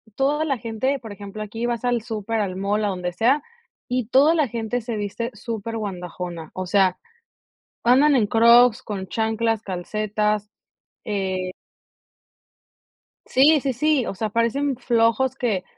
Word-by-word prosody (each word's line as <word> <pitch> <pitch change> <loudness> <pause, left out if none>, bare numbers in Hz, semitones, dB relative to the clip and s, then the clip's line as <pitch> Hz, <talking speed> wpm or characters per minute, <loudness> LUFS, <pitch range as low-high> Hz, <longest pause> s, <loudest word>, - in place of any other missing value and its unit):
toda 290 +3 +1
la 275 -5 0
gente, 240 +4 -2
por 225 -4 -9
ejemplo, 200 +1 -8
aquí 225 +3 -4
vas 240 0 -2
al 245 -2 +1
súper, 220 -1 -3
al 185 -2 -3
mall, 205 +2 0
a 205 - +1
donde 180 -2 -3
sea, 250 +10 +2 0.5
y 250 -3 -1
toda 290 +6 +5
la 300 -7 +1
gente 235 +2 -2
se 230 -1 -4
viste 210 +4 -3
superguandajona. 185 -7 -5
O 185 0 -4
sea, 190 -1 +2 0.8
andan 270 +4 +5
en 230 - +3
Crocs, 235 +2 +5
con 195 -3 -5
chanclas, 225 +1 0
calcetas, 210 +2 -2 0.6
eh 190 -3 -2 1.7
Sí, 295 +4 +5
sí, 270 -2 -1
sí, 300 0 +1
o - - -4
sea, 215 +2 -2
parecen 240 +4 0
flojos 235 +2 +2
que 220 -8 -1
225 Hz, 145 wpm, -23 LUFS, 205-245 Hz, 1.7 s, toda